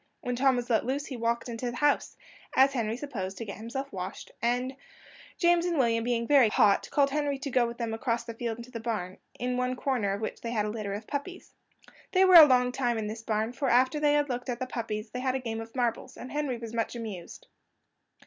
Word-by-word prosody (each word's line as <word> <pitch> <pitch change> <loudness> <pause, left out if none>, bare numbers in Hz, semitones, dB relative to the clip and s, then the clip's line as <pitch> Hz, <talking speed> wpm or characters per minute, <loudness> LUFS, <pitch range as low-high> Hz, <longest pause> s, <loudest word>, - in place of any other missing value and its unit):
When 245 0 -2
Tom 265 +1 +3
was 245 -1 -2
let 230 -3 +2
loose, 275 +3 -2
he 270 - -6
walked 235 0 -1
away - - -5
into 240 +2 -3
the 240 - -6
house, 290 -1 +1 0.4
as 270 +1 +5
Henry 230 -3 -1
supposed, 200 -9 -5
to 230 - -5
get 200 - -7
himself 255 +5 -5
washed; 185 +2 -6
and 250 +3 0 0.6
James 345 -1 +4
and 345 -2 0
William, 230 -3 +2
being 235 -1 0
very 270 -4 +5
hot, 205 -1 +3
called 280 -1 +2
Henry 290 -1 0
to 275 0 -5
go 245 -1 +3
with 235 0 -7
them 230 -2 -3
across 230 +1 -1
the 230 -1 -7
field 225 -1 -4
into 235 +1 -10
the 230 - -5
barn, 210 -5 -4 0.2
in 250 +1 -2
one 250 0 0
corner 245 -7 0
of 200 - -4
which 220 - -4
they 230 - -4
had 215 -3 0
a 210 - -2
litter 210 -2 -4
of 210 +2 -7
puppies. 295 +9 -6 0.6
They 380 0 +5
were 370 - +5
a 325 -3 +12
long 250 -2 +3
time 245 -2 0
in 220 - -2
this 220 +2 -5
barn, 220 +1 -1
for 270 0 -1
after 255 +4 +3
they 295 -1 +3
had 290 0 +2
looked 245 0 -4
at 240 - -1
the 255 - -3
puppies 220 -3 -4
they 250 - -4
had 260 0 0
a - - 0
game 225 -3 -4
at 225 +2 -11
marbles, 240 -3 -2
and 255 - -8
Henry 290 -4 -1
was 230 -1 -8
much 230 +1 -2
amused. 210 -7 -7
240 Hz, 245 wpm, -28 LUFS, 225-265 Hz, 0.6 s, a